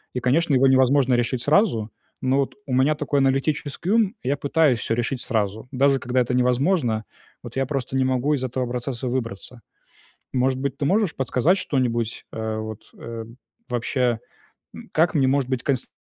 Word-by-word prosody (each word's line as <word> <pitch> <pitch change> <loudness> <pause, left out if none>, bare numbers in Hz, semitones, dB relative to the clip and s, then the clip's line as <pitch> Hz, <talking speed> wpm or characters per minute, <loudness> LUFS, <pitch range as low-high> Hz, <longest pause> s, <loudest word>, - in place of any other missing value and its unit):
И - - 0
конечно, 145 +4 +2
его 130 +1 +4
невозможно 130 0 +4
решить 120 +1 0
сразу, 145 - +2 0.3
но 130 +1 +2
вот 135 - -1
у 130 - -3
меня 135 +4 +3
такой 145 -1 0
аналитический 140 +5 0
ум 225 -1 +3
и 130 - -2
я 140 - +2
пытаюсь 140 -4 +2
всё 115 - -1
решить 120 +2 -2
сразу. 110 +1 -2
Даже 135 0 +3
когда 125 0 0
это 125 +1 -1
невозможно, 125 - +1 0.4
вот - - -9
я 135 - +1
просто 135 -2 -3
не 130 - +3
могу 130 +3 +1
из 130 - -4
этого 130 0 -2
процесса 125 +1 -4
выбраться. 120 -1 -4 0.7
Может 130 +1 +1
быть, 140 +1 -3
ты 140 - -1
можешь 195 0 +2
подсказать 135 +8 +2
что-нибудь? 120 - -1
Э, 110 0 -3
вот, 110 -1 -6
э, 115 -1 -6 0.4
вообще, 120 0 0 0.6
м, - - -11
как 165 +3 +2
мне 135 -4 +3
может 135 -1 +1
быть 130 -2 -1
конст 135 -4 -1
130 Hz, 180 wpm, -23 LUFS, 120-140 Hz, 0.7 s, его